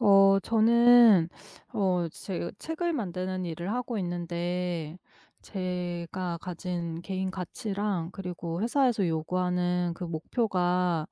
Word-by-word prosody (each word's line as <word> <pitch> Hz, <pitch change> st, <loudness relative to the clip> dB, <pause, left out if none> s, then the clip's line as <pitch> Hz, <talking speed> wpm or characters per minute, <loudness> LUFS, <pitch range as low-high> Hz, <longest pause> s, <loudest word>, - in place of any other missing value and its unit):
어. 195 Hz, -2 st, +6 dB
저는 230 Hz, -4 st, +6 dB, 0.5 s
어 180 Hz, -4 st, +1 dB
제가 175 Hz, +1 st, -5 dB
책을 335 Hz, +2 st, -2 dB
만드는 185 Hz, -, -3 dB
일을 170 Hz, +3 st, -4 dB
하고 245 Hz, -2 st, -2 dB
있는데 175 Hz, -2 st, -3 dB, 0.4 s
제가 180 Hz, -2 st, -4 dB
가진 170 Hz, -1 st, -4 dB
개인 190 Hz, 0 st, -2 dB
가치랑 190 Hz, -1 st, -3 dB
그리고 180 Hz, -2 st, -5 dB
회사에서 240 Hz, -4 st, +2 dB
요구하는 180 Hz, +2 st, 0 dB
그 180 Hz, -, -6 dB
목표가 180 Hz, -1 st, 0 dB
180 Hz, 225 characters per minute, -28 LUFS, 175-200 Hz, 0.5 s, 어